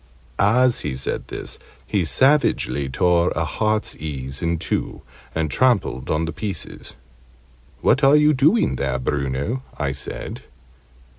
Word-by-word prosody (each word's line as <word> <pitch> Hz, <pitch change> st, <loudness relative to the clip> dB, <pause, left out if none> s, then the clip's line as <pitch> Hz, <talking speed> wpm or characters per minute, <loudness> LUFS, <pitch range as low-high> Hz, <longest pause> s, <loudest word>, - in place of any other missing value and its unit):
As 120 Hz, +4 st, +4 dB
he 75 Hz, -3 st, -3 dB
said 65 Hz, -, -3 dB
this, -, -, -7 dB, 0.3 s
he 95 Hz, -4 st, 0 dB
savagely 130 Hz, -, +2 dB
tore 85 Hz, +5 st, +2 dB
a 80 Hz, -, 0 dB
heartsease 75 Hz, -10 st, -2 dB
in 85 Hz, 0 st, 0 dB
two, 80 Hz, -, -3 dB, 0.3 s
and 80 Hz, -2 st, -1 dB
trampled 120 Hz, -, +1 dB
on 80 Hz, +1 st, +1 dB
the 80 Hz, -, -4 dB
pieces. 100 Hz, -3 st, -6 dB, 0.9 s
"What 135 Hz, -, +3 dB
are 135 Hz, +2 st, +7 dB
you 150 Hz, 0 st, +5 dB
doing 145 Hz, -, +3 dB
there, 65 Hz, -, -1 dB
Bruno?" 70 Hz, -, -2 dB, 0.2 s
I 70 Hz, -3 st, -1 dB
said. 70 Hz, -, -6 dB
85 Hz, 130 wpm, -22 LUFS, -, 0.9 s, are